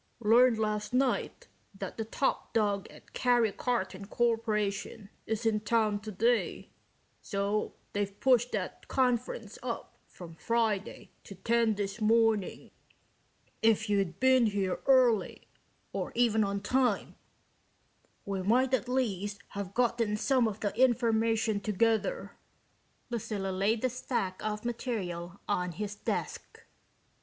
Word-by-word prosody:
"Learned 235 +2 +5
last 215 +1 -2
night 260 0 0 0.3
that 195 -1 -6
the 225 - -2
top 265 +5 -1
dog 205 -3 +1
at - - -17
Karry 240 -4 +3
Karton 205 -6 -2
Korporation 215 -3 -1 0.2
is 225 +1 -2
in 220 -1 +2
town 215 -1 +1
today, 220 +3 -1 0.5
so 200 +1 -2 0.2
they've 200 -1 -2
pushed 250 -2 +3
that - - -4
conference 240 -4 -1
up 240 -2 -6
from 170 -2 -11
Friday 220 +2 -1
to 195 - -10
ten 230 +3 +1
this 200 +2 -4
morning. 220 -2 +2 0.9
If 220 -1 +3
you'd 195 -4 0
been 260 -2 +5
here 195 -3 -1
early 255 -5 +3 0.5
or - - -3
even 225 -2 +3
on 200 0 -2
time 245 0 +1 1.1
we 195 -1 -2
might 250 +7 +2
at 250 -1 +1
least 205 -6 -1
have 200 -1 -6
gotten 235 -3 +1
some 255 +1 +2
of 215 -1 -5
the 205 - -2
information 225 -3 +2
together." 225 - 0 0.8
Lucilla 205 -4 -3
laid 205 +5 0
the 255 - +3
stack 230 -7 -3
of 210 +1 -3
material 195 -7 -4
on 180 -3 -1
his 205 +3 -4
desk. 205 - -5
220 Hz, 125 wpm, -30 LUFS, 200-235 Hz, 1.1 s, Learned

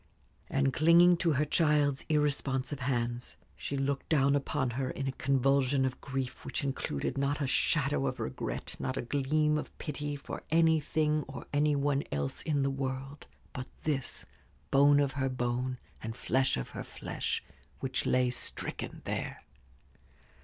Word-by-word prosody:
And 135 -1 +2
clinging 170 +3 +6
to 165 -2 +2
her 145 +2 +2
child's 150 -3 +2
irresponsive 140 -2 0
hands, 120 -2 -2 0.2
she 140 - -4
looked 135 0 -1
down 140 -3 +4
upon 140 -2 0
her 130 +2 -2
in 135 +1 -3
a - - +1
convulsion 135 0 +2
of 130 -1 -3
grief, 135 -2 -4
which - - -3
included 135 - -2
not 140 +2 0
a 145 - 0
shadow 70 - +2
of - - -3
regret, - - -4
not 130 - -2
a - - -1
gleam 150 +4 +1
of - - -8
pity 145 -1 -4
for 140 - -7
anything 155 -1 +3
or - - -7
any 145 0 +3
one 140 0 +1
else 70 -1 -2
in 145 -3 +1
the 135 - +1
world 135 +1 -4 0.3
but 130 0 -5 0.2
this 145 -4 -2 0.5
bone 145 +1 +6
of 140 -2 +2
her 135 -1 -1
bone 125 0 -1 0.2
and 110 +1 -5
flesh 130 - +1
of 65 - -4
her - - -6
flesh, - - -3 0.4
which 130 -1 -1
lay 125 -1 +3
stricken - - -2
there. - - -4
140 Hz, 155 wpm, -31 LUFS, 130-145 Hz, 0.5 s, clinging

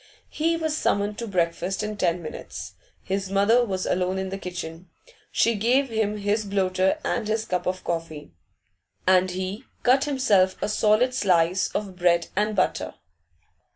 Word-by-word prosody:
He 330 +2 +1
was 315 -2 -1
summoned 205 -7 0
to 235 - -4
breakfast 180 +1 -1
in 210 0 -3
ten 175 -3 0
minutes. 155 - -7 0.3
His 195 0 -2
mother 205 +5 +4
was 190 -5 -2
alone 185 +1 0
in 190 0 -3
the 195 +1 -5
kitchen; 175 -1 -7 0.4
she 230 - +3
gave 245 +6 +2
him 215 -2 -1
his 205 +1 0
bloater 190 +2 +1
and 235 -3 -1
his 220 +1 -1
cup 180 -1 -2
of 185 0 -2
coffee, 165 - -4 0.7
and 185 0 +4
he 190 +6 -4 0.2
cut 265 +3 +4
himself 210 -10 +3
a - - -2
solid 215 +4 +3
slice 185 -5 +2
of 200 -3 -3
bread 175 -1 +2
and 210 +2 +1
butter. 185 - 0
195 Hz, 155 wpm, -25 LUFS, 185-220 Hz, 0.7 s, mother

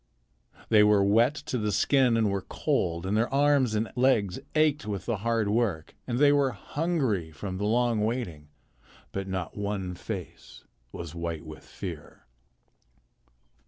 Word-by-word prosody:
They 110 -2 +6
were 105 -1 +5
wet 115 +8 +4
to 140 -4 -4
the 105 -1 -1
skin 130 0 +3
and 110 -3 +2
were 100 -1 -1
cold, 85 -1 -1
and 100 +2 0
their 115 +2 +1
arms 140 -4 +3
and 110 +1 -1
legs 125 -7 +2 0.2
ached 150 -5 +2
with 100 -2 -4
the 115 -3 -1
hard 115 +1 0
work, 100 -7 0
and 120 -1 -1
they 145 +1 +5
were 140 -3 +2
hungry 140 - -1
from 95 +4 -6
the 105 - -1
long 120 0 +2
waiting, 105 -10 -3 0.6
but 95 0 -4
not 95 -3 -4
one 100 -3 -3
face 90 0 -8 0.3
was 85 -2 -7
white 85 -2 -4
with 80 0 -10
fear. - - -9
105 Hz, 155 wpm, -27 LUFS, 95-125 Hz, 0.6 s, They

